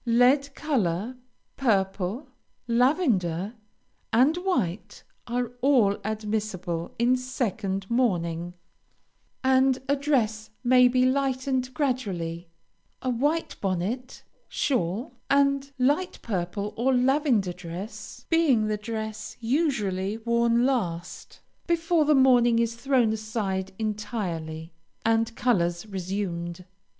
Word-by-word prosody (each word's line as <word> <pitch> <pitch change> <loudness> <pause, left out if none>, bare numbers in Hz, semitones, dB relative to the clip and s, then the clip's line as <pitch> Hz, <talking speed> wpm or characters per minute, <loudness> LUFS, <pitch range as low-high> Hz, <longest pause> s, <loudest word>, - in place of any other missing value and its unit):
Lead 260 +4 +3
color, 230 - -1 0.4
purple, 200 +1 0 0.4
lavender, 230 - +1 0.6
and 260 +8 +4
white, 245 - -2 0.2
are 240 0 -1
all 245 -7 +4
admissible 210 -5 -3
in 240 +2 +3
second 220 -7 -2
mourning, 175 -8 0 0.9
and 260 0 +4
the 280 - +3
dress 230 -7 0
may 250 0 +6
be 255 +1 +3
lightened 260 -1 0
gradually, 180 - -2 0.5
a 255 - 0
white 290 +7 0
bonnet, 200 +7 -3 0.3
shawl, 230 - -1 0.2
and 275 0 +2
light 290 +8 +1
purple 200 0 -3
or 255 +3 +2
lavender 250 - +2
dress, 195 +7 -8
being 300 -10 +3
the 215 0 -1
dress 220 0 -5
usually 225 - 0
worn 235 +1 +2
last, 180 -10 -3 0.3
before 335 -2 +2
the 300 0 +4
mourning 245 -3 +5
is 230 0 +1
thrown 240 -2 +2
aside 210 -4 -3
entirely, 180 -7 -4 0.3
and 225 0 +2
colors 175 -7 +1
resumed. 180 -3 -4
230 Hz, 100 wpm, -26 LUFS, 195-260 Hz, 0.9 s, may